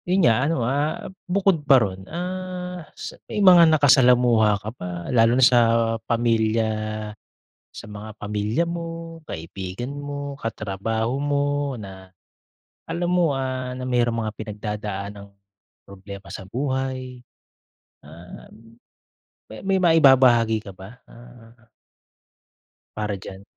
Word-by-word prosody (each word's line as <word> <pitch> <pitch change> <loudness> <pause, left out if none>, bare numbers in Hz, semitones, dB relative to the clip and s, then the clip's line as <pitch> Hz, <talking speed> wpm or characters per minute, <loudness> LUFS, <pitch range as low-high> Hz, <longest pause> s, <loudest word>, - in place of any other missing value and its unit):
Yun 185 0 +3
nga 125 +4 +3
ano, 135 -8 0
ah, 145 +8 -2 0.2
bukod 190 -3 +2
pa 140 -2 +6
roon, 95 -5 -2
ah, 180 +1 -5 0.2
s - - -7 0.2
may - - -5
mga 180 -5 +7
nakasalamuha 125 -7 +5
ka 105 +2 -7
ba 90 -7 -7 0.2
lalo 115 0 +4
na 130 - +6
sa 120 0 +6 0.5
pamilya 115 -1 +1 1.0
sa - - -10
mga 105 +1 -8
pamilya 105 +8 -1
mo, 165 -1 -6
kaibigan 95 - -6
mo, 145 -1 -6
katrabaho 110 0 -3
mo 145 0 0 0.3
na 95 -2 -11 0.8
alam 175 +1 -2
mo, 170 -6 +2
ah, 130 -1 -3
na 130 - -5
merong 120 -2 +1
mga 110 - -2
pinagdadaanang 105 -2 -6 0.6
problema 100 0 -11
sa - - -6
buhay? 130 0 -3 0.8
Ah, 85 +4 -13 1.2
may 195 -1 +2
maibabahagi 130 -9 +5
ka 100 - -9
ba? 95 +6 -13
Ah 120 -1 -16 1.3
para 105 -2 -2
diyan? 95 0 -10
120 Hz, 115 wpm, -23 LUFS, 105-145 Hz, 1.3 s, mga